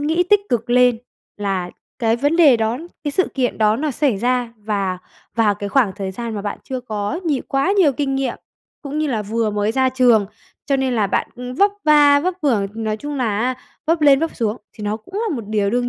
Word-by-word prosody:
nghĩ 320 +4 +1
tích 415 -1 +6
cực 235 -1 -1
lên 245 -1 +4 0.4
là 195 -3 -2 0.3
cái 230 0 +2
vấn 290 +6 +1
đề 290 -8 +6
đó, 225 +3 -1 0.3
cái 290 - 0
sự 375 +6 +1
kiện 255 -3 -1
đó 215 0 +3
nó 295 +3 -1
xảy 265 -5 +1
ra 245 0 0
và 200 -4 -2 0.4
vào 215 -3 +3
cái 205 0 -5
khoảng 230 -5 +2
thời 195 -1 -4
gian 230 +2 -5
mà 200 - -4
bạn 205 - -4
chưa 260 -1 -4
có 215 - -3
nhiều 290 -5 0
quá 275 +8 +1
nhiều 300 -7 +5
kinh 270 +1 -2
nghiệm 270 -3 -1 0.5
cũng 290 +1 -4
như 310 - +1
là 225 -6 -1
vừa 220 +1 -1
mới 210 +1 0
ra 260 +1 +2
trường, 245 -5 +3 0.4
cho 275 - +2
nên 265 -2 0
là 215 -3 +2
bạn, - - -1
ư, 250 0 -7
vấp 400 +10 +3
va 290 -2 +6
vấp 365 +3 -1
vưởng, 225 -9 +2
nói 220 -1 -2
chung 290 +6 -6
là 225 -6 0
á 255 +3 0 0.3
vấp 330 0 +2
lên 280 -2 +6
vấp 325 0 -2
xuống 225 -1 -1 0.2
thì 210 - -9
nó 210 +1 -1
cũng 225 - -17
là 425 -5 -1
một 230 - -6
điều 205 -2 +1
đương 245 +2 0
245 Hz, 235 wpm, -20 LUFS, 215-285 Hz, 0.5 s, tích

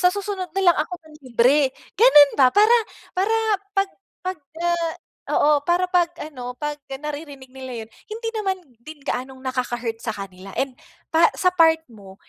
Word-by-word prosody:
sa 360 - +6
susunod 395 -2 -4
na 390 - +2
lang - - -8
ako 310 - -4
manlibre," 275 -2 +2 0.3
gano'n 295 - +8
ba? 260 -2 +7
Para 425 +3 +5 0.4
para 420 +4 +2 0.4
pag 390 0 +2 0.3
pagka 345 -1 -3 0.6
oo, 295 0 +4
para 355 +1 +2
'pag 355 -2 +4 0.2
ano 250 -5 -7
pag 295 0 -3
naririnig 285 -1 -7
nila 260 -3 -7
yo'n, 225 - -23 0.2
hindi 455 +1 -4
naman 390 -3 -1 0.3
din 305 +1 -11
gaanong 260 -1 -4
nakaka-hurt 245 -3 -3
sa 225 - -3
kanila 195 -1 -9
and 265 -2 -2 0.3
pa 330 +1 +6
sa 365 - +2
part 325 -2 +5
mo 200 -4 -13
295 Hz, 155 wpm, -23 LUFS, 255-360 Hz, 0.6 s, gano'n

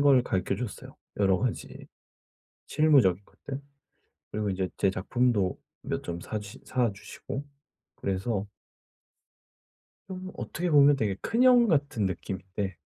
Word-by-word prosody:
걸 140 -3 +6
가르쳐 95 -6 -1
주셨어요 120 -4 -7 0.2
여러 95 -2 +3
가지 125 0 -4 0.8
실무적인 125 - +4
것들. 140 0 -8 0.7
그리고 105 -1 -1
인제 95 -1 -1
제 95 - +3
작품도 105 -1 +1 0.3
몇 - - -3
점 85 0 -4
사시 105 -1 -6
사 120 -4 +1
주시고. 135 +7 -7 0.5
그래서 100 +1 -2 1.6
음 185 0 -6
어떻게 175 +2 -3
보면 145 -1 +7
되게 105 -5 0
큰 230 +2 0
형 245 -2 +7
같은 140 - +1
느낌인데 95 +1 -4
110 Hz, 250 characters per minute, -28 LUFS, 95-145 Hz, 1.6 s, 보면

